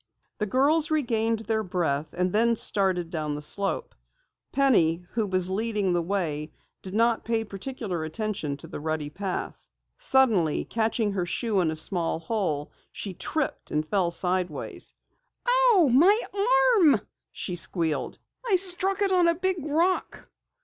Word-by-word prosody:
The 210 - -1
girls 290 +8 +2
regained 230 -7 0
their 220 +1 0
breath, 160 -6 -2
and 180 +1 -1
then 230 +2 +3
started 185 -6 +2
down 155 -3 -3
the 150 - -6
slope. 200 - 0 0.6
Penny, 180 -12 +2
who 225 -3 -1
was 185 -1 +3
leading 205 -1 -1
the 175 - +1
way, 165 -5 -3 0.3
did 190 +1 -7
not 230 +1 +2
pay 225 -1 -1
particular 200 -4 -5
attention 160 -4 -3
to - - -9
the - - -7
rutty 155 -1 -3
path. 190 +3 -5 0.3
Suddenly 240 - +2
catching 225 -1 -1
her 180 -3 -2
shoe 215 +2 -1
in 170 -3 +1
a 160 - -3
small 165 +1 +2
hole, 165 -5 -3 0.2
she 195 - -5
tripped 305 - -3
and 155 +1 -2
fell 185 -1 +1
sideways. 180 -2 -2 0.8
"Ooh, 340 -7 +4
my 350 - +5 0.6
arm!" 285 - +5 0.3
she 180 - -4
squealed. 165 -2 +1 0.3
"I 455 -6 +2
struck 380 +2 +1
it 395 - +1
on 360 -2 +4
a 335 - +3
big 375 +2 0
rock!" 325 +6 -1
200 Hz, 150 wpm, -26 LUFS, 170-260 Hz, 0.8 s, my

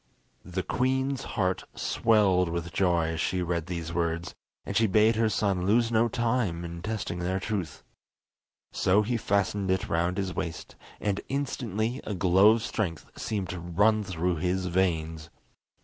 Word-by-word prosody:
The - - -4
queen's 130 +1 0 0.2
heart 95 -2 0
swelled 95 -6 +3
with 85 0 -4
joy 85 -4 +2
as 80 +1 -2
she 90 -1 0
read 85 -1 -2
these 85 -2 -4
words, 85 0 -1 0.3
and 100 - -5
she 115 +1 +4
bade 110 +3 +4
her 110 0 +2
son 95 -3 0
lose 115 +2 +3
no 115 +1 +3
time 115 -7 -1
in 85 0 -7
testing 105 -4 -3
their 95 +2 -1
truth. 95 -7 -4 0.9
So 100 +3 +3
he 120 +3 -1
fastened 100 -2 0
it 95 0 0
round 85 +3 0
his 95 -2 -2
waist, 80 -2 -5 0.2
and 100 -1 -1
instantly 125 -3 -2
a 105 - -4
glow 95 +3 +5
of 115 -1 -2
strength 90 -9 -3
seemed 100 -5 -3
to 90 - -4
run 105 +6 +2
through 90 -2 -1
his 90 +2 -1
veins. 80 -3 -1
95 Hz, 160 wpm, -28 LUFS, 85-110 Hz, 0.9 s, glow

